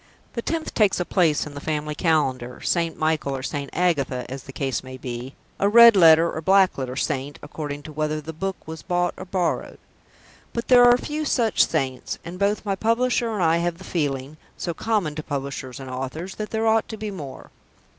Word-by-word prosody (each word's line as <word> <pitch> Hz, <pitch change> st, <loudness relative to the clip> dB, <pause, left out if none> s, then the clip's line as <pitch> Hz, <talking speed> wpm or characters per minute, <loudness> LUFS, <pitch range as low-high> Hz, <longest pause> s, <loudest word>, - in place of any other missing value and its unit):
The 235 Hz, -, -3 dB
tenth 320 Hz, +5 st, -3 dB
takes 210 Hz, -4 st, +3 dB
a 175 Hz, -, -1 dB
place 165 Hz, -6 st, +2 dB
in 150 Hz, -, -9 dB
the 140 Hz, -, -7 dB
family 150 Hz, -1 st, -2 dB
calendar; 130 Hz, -7 st, 0 dB
St. 170 Hz, -2 st, -1 dB
Michael 155 Hz, -3 st, 0 dB
or 130 Hz, -, -7 dB
St. 140 Hz, 0 st, -4 dB
Agatha, 145 Hz, -8 st, 0 dB
as 135 Hz, +1 st, -6 dB
the 135 Hz, -, -9 dB
case 135 Hz, -1 st, -2 dB
may 130 Hz, 0 st, -9 dB
be, 125 Hz, +1 st, -6 dB, 0.2 s
a 200 Hz, -, +3 dB
red 235 Hz, +1 st, +9 dB
letter 165 Hz, -2 st, +7 dB
or 160 Hz, -, -4 dB
black 190 Hz, +2 st, +4 dB
letter 130 Hz, -2 st, -4 dB
saint, 140 Hz, 0 st, -2 dB
according 145 Hz, -1 st, -6 dB
to 155 Hz, -, -9 dB
whether 155 Hz, 0 st, -1 dB
the 160 Hz, +2 st, -7 dB
book 190 Hz, +4 st, -3 dB
was 160 Hz, 0 st, -7 dB
bought 175 Hz, 0 st, 0 dB
or -, -, -8 dB
borrowed. 180 Hz, -2 st, -2 dB, 0.8 s
But 235 Hz, -, -4 dB
there 245 Hz, -1 st, +8 dB
are 245 Hz, 0 st, +7 dB
few 300 Hz, +4 st, -4 dB
such 235 Hz, -7 st, +2 dB
saints, 130 Hz, -2 st, -2 dB
and 175 Hz, +2 st, -7 dB
both 205 Hz, +2 st, 0 dB
my 200 Hz, -1 st, 0 dB
publisher 230 Hz, +3 st, +1 dB
and 205 Hz, -5 st, -1 dB
I 165 Hz, 0 st, +4 dB
have 170 Hz, 0 st, -1 dB
the 185 Hz, -, -12 dB
feeling 145 Hz, -4 st, -2 dB, 0.2 s
(so 170 Hz, -, -3 dB
common 205 Hz, -5 st, -1 dB
to 155 Hz, -, -5 dB
publishers 140 Hz, -3 st, -5 dB
and 135 Hz, -, -8 dB
authors) 135 Hz, +8 st, -5 dB
that 215 Hz, -1 st, -4 dB
there 220 Hz, 0 st, -1 dB
ought 225 Hz, 0 st, +3 dB
to 220 Hz, -, -6 dB
be 215 Hz, -1 st, -4 dB
more. 150 Hz, -9 st, -9 dB
160 Hz, 205 wpm, -23 LUFS, 140-200 Hz, 0.8 s, red